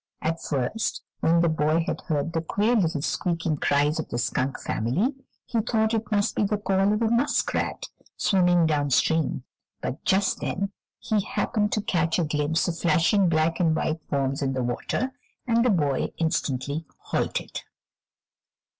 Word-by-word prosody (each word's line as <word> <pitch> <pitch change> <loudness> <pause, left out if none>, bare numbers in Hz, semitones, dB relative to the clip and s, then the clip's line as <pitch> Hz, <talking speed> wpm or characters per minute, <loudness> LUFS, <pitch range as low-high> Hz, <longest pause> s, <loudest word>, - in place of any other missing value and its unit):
At 165 +1 -2
first, 145 - -2 0.2
when 170 +1 +3
the 170 - +3
boy 160 +1 +2
had - - -3
heard 155 0 -1
the 165 - 0
queer 210 +8 +1
little 165 -8 +1
squeaking 165 -3 -1
cries 145 +3 +2
of 160 - -4
the - - -3
skunk 130 +3 -1
family, 140 - 0 0.3
he 235 - -1
thought 220 0 +1
it 225 0 -2
must 205 -1 +1
be - - +1
the 210 +1 +1
call 195 -1 +2
of 210 +2 +1
a 225 - +2
muskrat, 240 +5 0 0.3
swimming 180 -3 +3
down 145 -2 +1
stream, 150 0 +1 0.4
but 130 - -5
just 195 +1 +2
then 195 +1 -2 0.3
he 215 -2 0
happened 210 +1 -1
to 210 - 0
catch 165 -3 +1
a 175 - +2
glimpse 150 +1 0
of 170 -1 -3
flashing 175 +3 +3
black 160 0 +1
and 165 -3 +3
white 160 0 -1
forms 140 -1 0
in 135 -1 0
the 130 -1 -1
water, 185 - -2 0.3
and 235 -1 +3
the 250 - +3
boy 145 - +1
instantly 145 -2 -1 0.2
halted. - - -2
165 Hz, 165 wpm, -25 LUFS, 150-205 Hz, 0.4 s, when